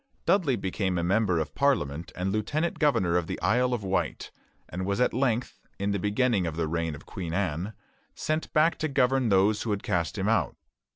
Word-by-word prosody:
Dudley 170 -10 +3
became 95 -2 -1
a 85 - 0
member 95 0 +2
of 80 - -2
Parliament 85 - 0
and 90 +2 -1
lieutenant 145 +11 -1
governor 115 - +3
of 85 -2 -1
the - - -4
Isle 125 +4 +2
of 120 -4 -2
Wight, 95 0 -2 0.4
and 90 +3 -5
was 100 +3 -1
at 125 - +2
length, 125 -2 0 0.2
in 100 +1 -1
the 100 - 0
beginning 105 -1 +1
of 80 - -4
the 80 -1 -1
reign 80 -1 -2
of 70 - -13
Queen 85 -3 -5
Anne, 95 +1 -1 0.4
sent 155 +1 -2
back 160 +2 +3
to 155 - 0
govern 135 -3 +2
those 100 +2 +3
who 115 - -3
had 100 -1 -1
cast 85 -3 -1
him - - -1
out. - - +1
100 Hz, 205 wpm, -27 LUFS, 90-125 Hz, 0.4 s, Dudley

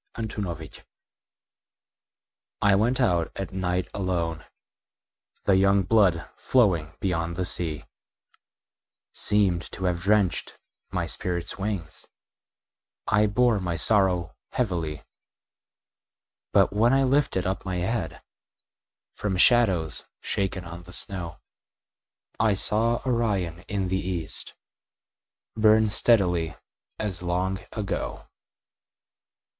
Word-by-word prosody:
Winter 110 -2 -4
Stars 80 -5 -7 1.8
I 100 -1 +4
went 115 +6 +2
out 90 -10 +1
at 95 0 -6
night 90 -1 -1
alone; 85 -4 -2 1.0
The 100 - +3
young 100 0 +3
blood 95 -4 +2
flowing 90 -10 +1
beyond 85 -2 -2
the 90 +1 -1
sea 80 -4 +1 1.3
Seemed 100 -5 +3
to 95 - -6
have 90 -2 0
drenched 100 0 +1 0.3
my - - -2
spirit's 85 +1 -1
wings 95 -5 -4 1.0
I 105 +1 +3
bore 115 +1 +2
my 90 -2 -3
sorrow 90 -3 +3 0.2
heavily. 85 -10 -2 1.5
But - - +3
when 115 +5 +3
I 135 0 +3
lifted 130 -8 +1
up 95 +1 -2
my 95 -1 -4
head 90 -2 -3 0.9
From 95 -3 -3
shadows 95 - +3
shaken 95 -2 -2
on 85 +1 -9
the 90 0 -12
snow, 90 -4 -1 1.0
I 110 -2 +3
saw 115 +4 +1
Orion 105 -9 -1
in 95 -2 -2
the 95 +1 0
east 85 -4 -2 1.0
Burn 110 0 +4
steadily 90 -8 +3 0.4
as 95 -5 -4
long 90 +2 -1
ago. 105 -4 -4
95 Hz, 105 wpm, -25 LUFS, 85-105 Hz, 1.8 s, I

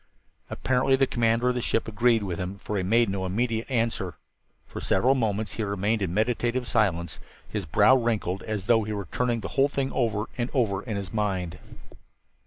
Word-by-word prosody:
Apparently 130 +1 +2
the 135 0 +3
commander 120 0 +1
of - - +2
the 125 - -2
ship 115 - 0
agreed 115 0 +2
with 90 -4 -4
him, 95 +2 -4
for 105 - -5
he 100 - +1
made 115 +6 +3
no 95 -1 -2
immediate 115 +5 -1
answer. 115 - -1 0.5
For - - -7
several 130 +3 +3
moments 110 -5 -1
he 110 - -3
remained 100 +2 0
in 95 -4 -1
meditative 120 +4 0
silence, 85 -7 0 0.3
his 100 -6 -4
brow 105 +9 +5
wrinkled, 110 -7 0
as 105 -3 -4
though 115 0 +4
he 105 +1 -4
was 100 -2 -4
turning 120 -2 0
the - - -5
whole 140 +1 +2
thing 135 -1 -2
over 110 -4 0
and 120 +1 0
over 100 -7 +1
in 110 -2 -4
his 100 -4 -6
mind. 95 -5 -2
110 Hz, 195 wpm, -26 LUFS, 100-120 Hz, 0.5 s, brow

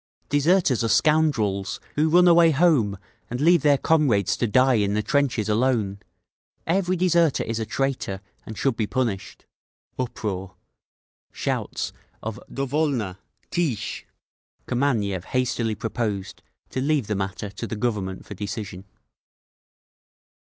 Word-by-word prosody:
Deserters 145 - +3
are - - +1
scoundrels, 110 -8 +2
who 155 +2 +2
run 175 +2 +6
away 170 -1 +7
home 140 - +3 0.3
and 125 - -4
leave 170 +2 +5
their 145 -1 +4
comrades 135 - +2
to 120 - 0
die 130 +4 +4
in 105 -3 +1
the 105 - 0
trenches 130 -4 +1
alone! 110 -3 +1 0.7
Every 185 +1 +1
deserter 170 -4 +3
is 115 0 -3
a 110 - -3
traitor, 125 -5 -2 0.2
and 110 - -9
should 135 -4 +1
be 110 -1 -1
punished…." 105 -6 -3 0.5
Uproar, 100 -6 -4 0.8
shouts - - -3 0.3
of 110 -1 -4
"Do 135 - -2
volno! 130 - -1 0.3
Teesche!" 155 - -2 0.6
Kameniev 115 -8 0
hastily 120 -3 0
proposed 105 -4 -3 0.3
to 130 - -2
leave 145 -3 +1
the 105 - -2
matter 100 0 -3
to 100 - -6
the - - -4
Government 105 -4 -2
for - - -8
decision. 100 -1 -6
120 Hz, 130 wpm, -24 LUFS, 105-145 Hz, 0.8 s, away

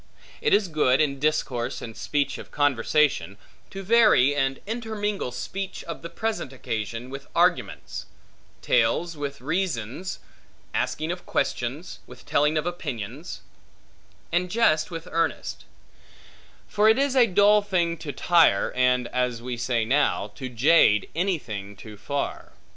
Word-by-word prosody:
It - - +1
is 200 -1 +4
good, 150 -5 +2
in 140 -3 +1
discourse 130 -4 -1
and 115 -2 -8
speech 140 +8 -1
of - - -10
conversation, 145 -5 +1 0.3
to 195 0 -7
vary 210 - +5
and 135 -1 0
intermingle 210 - -3
speech 190 +10 -5
of 170 - -7
the 170 - -7
present 215 - -3
occasion, 115 0 -5
with 140 +1 -8
arguments, - - 0 0.6
tales 125 +8 +2
with 140 -3 -5
reasons, 160 - -2 0.6
asking 155 +2 -1
of 175 0 -7
questions, 135 +4 -2
with 125 0 -14
telling 150 +2 +2
of 155 - -1
opinions, 140 - -5 0.9
and 180 +2 +1
jest 175 -8 +2
with 165 -1 -7
earnest: 165 0 -2 1.0
for 215 +1 +3
it 220 - +5
is 275 0 +1
a 245 -3 +6
dull 205 +2 +5
thing 175 -4 0
to 150 - -6
tire, 170 +5 +3
and, 125 -1 +2
as 125 -2 -1
we 125 +1 -5
say 120 -1 0
now, 145 +5 +1
to 130 -3 -6
jade, 120 -4 +4
any 180 +2 +1
thing 100 -7 -7
too 105 +1 -11
far. 140 +7 -4
145 Hz, 140 wpm, -25 LUFS, 125-180 Hz, 1.0 s, a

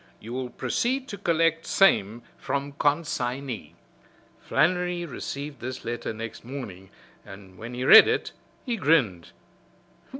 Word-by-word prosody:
You 115 +2 -9
will 130 -1 -3
proceed 255 - -1
to 200 - -6
collect 165 -2 +1
same 115 - +3
from 140 +1 -3
consignee." 130 - -1 0.6
Flannery 180 -1 0
received 140 -1 -6
this 130 +1 -6
letter 120 0 -3
next 115 0 -7
morning, 105 -8 -8 0.3
and 95 -1 -13
when 115 +6 -8
he 125 - -3
read - - +10
it - - -1 0.3
he 240 -3 -2
grinned. 125 - +2
130 Hz, 125 wpm, -26 LUFS, 115-165 Hz, 0.6 s, read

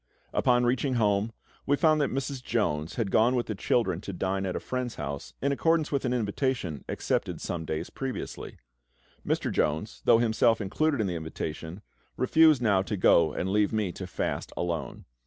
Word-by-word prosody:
Upon 125 -1 +3
reaching 130 +2 +1
home, 105 -1 +2 0.4
we 145 - +4
found 155 -1 +4
that 140 - +1
Mrs. 135 0 -3
Jones 80 -10 -1
had 110 -5 -1
gone 120 +4 +4
with 120 - 0
the 110 - -3
children 100 -3 0
to 100 - -6
dine 95 +2 -1
at 90 - -3
a - - -1
friend's 125 -2 -3
house, 70 -1 -6
in 140 - +2
accordance 160 +2 +1
with 140 -2 0
an 125 - 0
invitation 115 - -1
accepted - - -1
some 85 -2 -4
days 80 +2 -4
previously. 135 -1 -5 0.7
Mr. - - -1
Jones, 80 +9 -1
though 115 - +7
himself 115 0 +3
included 140 +7 0
in - - +1
the 90 - -2
invitation, 80 +3 -6 0.3
refused 155 0 +5
now 100 -4 +4
to 100 +2 -3
go 85 -3 +5
and 95 - -2
leave 105 0 +2
me 105 -4 0
to 95 +1 -7
fast - - -3
alone. 85 -2 -3
110 Hz, 180 wpm, -28 LUFS, 90-130 Hz, 0.7 s, though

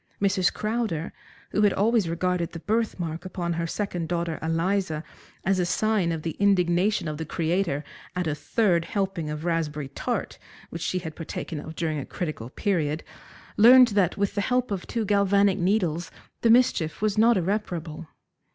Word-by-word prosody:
Mrs. 195 -2 +2
Crowder, 215 -7 -2 0.4
who - - +1
had 205 -2 +4
always 215 -3 +2
regarded 175 0 -1
the 165 - -6
birthmark 180 -6 -2
upon 180 -2 -3
her 170 0 -2
second 175 -3 -3
daughter 170 -2 -2
Eliza 165 0 0 0.4
as 190 0 +2
a - - +2
sign 215 -4 +1
of 160 -2 -3
the 165 - -3
indignation 185 -1 +2
of 155 0 -4
the - - -2
Creator 165 -1 -1 0.3
at 180 0 -1
a 155 - 0
third 170 +3 +1
helping 195 -6 -2
of 150 +2 -5
raspberry 150 -4 -1
tart 135 - -3 0.3
which 170 - -6
she 185 - -1
had 160 -4 -5
partaken 165 -1 -5
of 160 +2 -8
during 155 -2 -1
a 135 - -5
critical 155 -9 -5
period, 160 -2 -1 0.5
learned 250 +3 +8
that, 200 -5 +1
with 200 0 0
the 205 - 0
help 250 +2 0
of 195 -3 -3
two 230 -2 -2
galvanic 200 -1 +3
needles, 175 -3 0 0.3
the 230 - +3
mischief 225 -9 +3
was 210 -1 +1
not 225 +1 +5
irreparable. 170 -4 -3
180 Hz, 170 wpm, -26 LUFS, 165-205 Hz, 0.5 s, learned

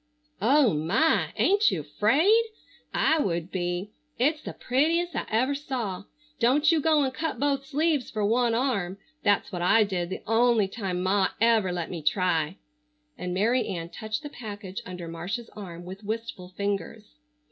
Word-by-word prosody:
"Oh, 260 - +4
my! 175 - +2
Ain't 410 +2 +4
you 160 - -2
afraid? 280 - +3 0.5
I 320 0 +2
would 170 - -1
be. 175 +2 -2 0.3
It's 300 +5 +1
the - - -6
prettiest 330 +7 +1
I - - -2
ever 255 +6 +2
saw. 240 -10 -4 0.3
Don't 275 +6 +4
you 325 -2 +2
go 310 -1 +3
and 260 -1 -1
cut 320 +4 -3
both 275 -1 0
sleeves 300 -2 0
for 210 -1 -1
one 235 +2 +2
arm. 200 -8 -1 0.2
That's 205 +1 +2
what 180 -3 -4
I 215 +5 +5
did 180 -4 -2
the 190 - -5
only 225 -2 +3
time 190 -3 -3
Ma 190 +1 +3
ever 225 -4 +3
let 175 -2 -3
me 170 -3 -5
try." 165 +1 +1 0.6
And 180 0 -5
Mary 225 +7 +1
Ann 170 -2 -4
touched 220 - -5
the 290 - -6
package 205 -7 -7
under 180 -2 -7
Marcia's 190 +8 -5
arm 175 -5 -9
with 190 +3 -9
wistful 215 -4 -5
fingers. 200 - -4
215 Hz, 165 wpm, -27 LUFS, 185-270 Hz, 0.6 s, I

